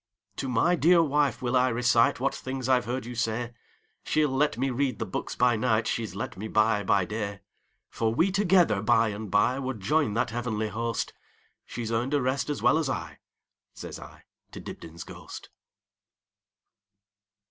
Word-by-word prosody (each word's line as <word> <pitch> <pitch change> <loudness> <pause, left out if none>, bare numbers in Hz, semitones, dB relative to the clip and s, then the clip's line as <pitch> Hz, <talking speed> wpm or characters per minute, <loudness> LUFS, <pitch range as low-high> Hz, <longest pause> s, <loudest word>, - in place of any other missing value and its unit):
"To 135 - -3
my 145 +9 +3
dear 170 +1 +5
wife 145 -3 +1
will 120 +1 0
I 130 0 +3
reciteWhat 120 +2 +2
things 130 -1 -5
I 130 -1 +4
've 125 - -10
heard 125 0 -3
you 120 - -6
say; 115 +1 -2 0.5
She 155 0 +2
'll 145 - -1
let 145 -4 +1
me 135 +2 0
read 130 -2 -1
the - - -3
books - - -5
by 125 -1 +3
nightShe 110 0 0
's 95 - -11
let 100 - -5
me 105 +4 -6
buy 110 -1 +2
by 100 -2 +2
day. 100 -1 -4 0.5
For 115 -1 0
we 165 +11 +2
together 180 - +3
by 110 +1 +3
and 105 -1 -6
byWould 130 +4 +1
join 135 +1 +1
that 115 - 0
heavenly 110 -2 -2
host; 115 +1 -3 0.5
She 120 - -5
's 110 - -4
earned 120 +5 0
a 145 - +2
rest 130 +3 -1
as 145 - -3
well 160 - +4
as 155 -4 -1
I,"Says 80 - -9
I - - -13 0.3
to - - -7
Dibdin's 85 +1 -9
ghost. - - -10
120 Hz, 175 wpm, -27 LUFS, 110-135 Hz, 0.5 s, dear